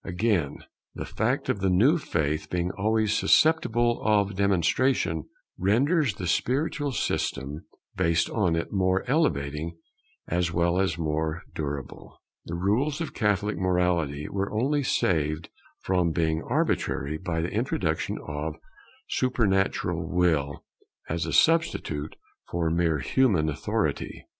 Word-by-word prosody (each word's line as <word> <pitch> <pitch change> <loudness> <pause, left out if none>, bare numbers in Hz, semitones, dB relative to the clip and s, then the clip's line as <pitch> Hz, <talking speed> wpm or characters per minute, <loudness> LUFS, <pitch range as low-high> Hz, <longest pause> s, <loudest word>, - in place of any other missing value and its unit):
Again, 95 -5 -1 0.3
the - - -5
fact - - -1
of - - 0
the 95 0 +1
new 125 - +4
faith 75 - -2
being 90 0 -1
always 110 +1 +1
susceptible 120 -4 +3
of 100 -2 +2
demonstration, 95 - +1 0.3
renders 130 - +2
the 90 - -5
spiritual 140 - 0
system 70 - -2 0.3
based 85 -2 +2
on 90 -7 +1
it 85 - -3
more 95 -1 +2
elevating 80 - 0 0.5
as 85 0 0
well 85 +1 +1
as 95 -4 +1
more 80 0 -2
durable. 70 -3 -6 0.3
The 85 - -5
rules 115 - 0
of 165 - -4
Catholic 105 -1 0
morality 90 -6 0
were 100 0 -2
only 135 +7 +1
saved 80 - 0 0.3
from 90 -2 +1
being 80 0 0
arbitrary 75 +3 0
by 85 -3 -2
the 85 - -3
introduction 95 -8 -1
of 75 +1 -4
a - - -25 0.5
supernatural 95 -8 0
Will 80 -6 +1 0.5
as 85 +1 -1
a - - -2
substitute 155 - +2 0.3
for 85 -2 0
mere 85 -2 +2
human 90 - +2
authority. 75 - -2
90 Hz, 125 wpm, -26 LUFS, 80-110 Hz, 0.5 s, new